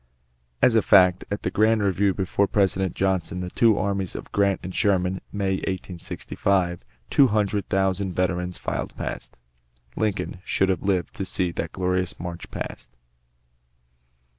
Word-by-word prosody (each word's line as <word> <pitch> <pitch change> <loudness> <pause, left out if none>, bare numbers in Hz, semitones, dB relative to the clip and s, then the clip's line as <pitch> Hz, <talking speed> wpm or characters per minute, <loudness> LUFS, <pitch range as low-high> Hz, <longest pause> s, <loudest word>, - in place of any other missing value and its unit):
As 125 - +6
a 110 - +5
fact, 90 -2 +5
at 100 - -3
the - - -1
grand 110 0 +3
review 100 0 +2
before 100 +1 +1
the - - -34
President 95 -2 +1
(Johnson) 95 -2 0
the 90 0 -5
two 115 -3 +4
armies 100 -1 -1
of - - -7
Grant 100 -1 +2
and 95 0 -6
Sherman, 95 -3 +1
May, 95 -2 0
1865, 90 0 -2 0.3
two 140 - +6
hundred 105 -2 0
thousand 95 -1 0
veterans 90 0 -1
filed - - -4
past. - - -6 0.6
Lincoln 105 -3 -2
should 95 -1 +1
have 95 - 0
lived 95 -3 0
to - - -2
see 90 -2 -1
that 85 -1 -4
glorious 90 0 -1
march 85 0 -6
past. - - -7
95 Hz, 150 wpm, -24 LUFS, 90-100 Hz, 0.6 s, As